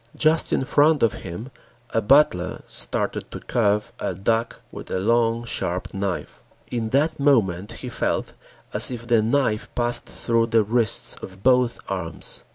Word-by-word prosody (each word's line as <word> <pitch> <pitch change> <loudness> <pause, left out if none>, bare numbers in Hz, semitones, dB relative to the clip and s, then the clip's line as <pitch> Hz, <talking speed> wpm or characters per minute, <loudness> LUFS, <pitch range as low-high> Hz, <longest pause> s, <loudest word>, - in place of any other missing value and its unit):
Just 155 +1 +2
in 130 - +1
front 145 -1 +3
of 115 - +3
him 95 +9 -7 0.4
a 115 - +1
butler 105 -7 +3
started - - -1
to - - -7
carve 105 -3 0
a 95 - -3
duck 115 +5 -1
with - - -9
a - - -1
long, 115 +3 +1
sharp 90 -5 -3
knife. 95 -2 -4 0.3
In 115 -2 -2
that 145 +6 +1
moment 105 -10 +2
he - - -7
felt - - -2 0.4
as - - +8
if 120 -2 -6
the 115 -2 +3
knife 115 -1 0
passed 120 0 +1
through 115 -1 0
the 115 -1 +3
wrists 115 0 0
of 95 +1 -11
both 125 -2 +3
arms. 90 -4 -2
115 Hz, 160 wpm, -23 LUFS, 100-125 Hz, 0.4 s, as